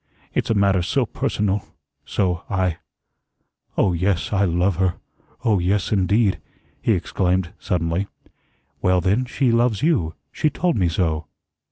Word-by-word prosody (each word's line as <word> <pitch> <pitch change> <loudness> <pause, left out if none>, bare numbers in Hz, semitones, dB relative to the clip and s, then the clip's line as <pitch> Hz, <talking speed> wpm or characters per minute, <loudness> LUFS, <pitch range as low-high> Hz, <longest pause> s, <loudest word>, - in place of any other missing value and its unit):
It's - - -1
a 115 - +2
matter 100 -2 +3
so 85 - +1
personal 100 -1 -1 0.4
so 90 -3 0
I 95 -4 0 1.0
Oh, 95 - +3
yes, 90 +3 0
I 100 0 +3
love 90 +1 +1
her. 95 -2 +1 0.5
Oh, 105 -4 +3
yes, 95 +2 0
indeed," 100 +1 +2 0.4
he - - +3
exclaimed, 90 0 0
suddenly. 85 +2 -1 0.7
"Well, 90 0 +3
then, 100 +8 +1
she 130 0 +1
loves 115 -1 +2
you. 130 - +1 0.2
She 155 - +1
told 175 +1 0
me 90 -5 +2
so." 80 -2 -1
95 Hz, 140 wpm, -22 LUFS, 90-105 Hz, 1.0 s, matter